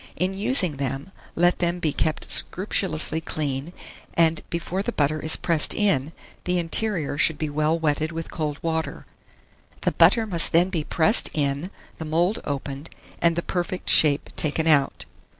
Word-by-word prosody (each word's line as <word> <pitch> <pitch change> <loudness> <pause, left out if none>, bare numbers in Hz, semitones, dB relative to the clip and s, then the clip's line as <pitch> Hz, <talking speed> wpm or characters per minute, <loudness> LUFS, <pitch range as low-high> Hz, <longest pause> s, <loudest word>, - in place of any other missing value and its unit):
In 185 +1 -1
using 195 - +2
them, 135 +5 -4 0.2
let 175 +1 +2
them 175 0 0
be 160 -4 -1
kept 155 - -1
scrupulously 165 -4 +1
clean, 145 -1 -3 0.4
and 165 -1 +2
before 170 +3 -3
the 240 - -3
butter 155 -4 0
is 155 +1 0
pressed 165 -3 +2
in, 160 -9 +1 0.3
the 180 0 +1
interior 170 -3 -2
should 160 +1 +3
be 155 -2 -3
well 155 +2 +1
wetted 155 0 -1
with 165 0 -6
cold 150 -3 -3
water; 160 -1 -3 0.8
the - - +1
butter 225 -2 +4
must 175 -6 +1
then 175 +3 +4
be 165 -5 -1
pressed 175 +8 +4
in, 145 +3 -1 0.3
the 160 - -5
mould 170 +7 +1
opened, 140 +2 -5 0.3
and 170 -1 +3
the 170 - -2
perfect 180 +1 -2
shape 145 -2 +3
taken 155 +1 +1
out. 145 -4 +2
160 Hz, 160 wpm, -24 LUFS, 150-175 Hz, 0.8 s, butter